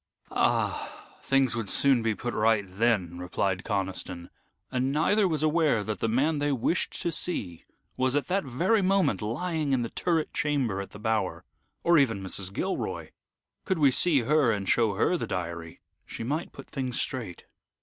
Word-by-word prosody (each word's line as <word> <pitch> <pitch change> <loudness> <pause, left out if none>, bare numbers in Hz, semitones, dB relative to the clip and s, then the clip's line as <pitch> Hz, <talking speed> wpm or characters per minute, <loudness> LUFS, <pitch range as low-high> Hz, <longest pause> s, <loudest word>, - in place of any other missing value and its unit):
"Ah! - - 0 0.2
Things 135 -3 +2
would 115 -4 -3
soon 135 -4 +4
be 110 -1 0
put 120 +2 -4
right 110 -1 +2
then," 95 -3 0
replied 95 +1 -1
Conniston, 95 -4 -3 0.4
and 130 +1 0
neither 190 +8 +3
was 155 -3 -1
aware 155 -8 +2
that 110 0 -4
the 115 - 0
man 145 +7 +1
they 145 0 +1
wished 140 +7 -1
to 170 - 0
see 100 - -3 0.3
was 130 +1 +1
at 145 - +1
that 195 +2 0
very 175 - +1
moment 190 - +2
lying 150 +6 -1
in 125 -2 +1
the 115 - -5
turret 165 -3 -1
chamber 130 -10 0
at 100 - -8
the - - -11
Bower, 110 0 -1 0.4
"or 170 -2 +5
even 115 -8 +1
Mrs. 95 0 -4
Gilroy. - - -3 0.5
Could 190 - -1
we 145 -4 +5
see 145 +1 +3
her, 140 0 +3
and 100 -3 -2
show 110 -2 +2
her 180 - +2
the - - -4
diary, 85 -2 -5 0.3
she - - -6
might 150 +8 -2
put - - -11
things 130 -4 -3
straight." 115 -10 -4
125 Hz, 175 wpm, -27 LUFS, 100-150 Hz, 0.5 s, or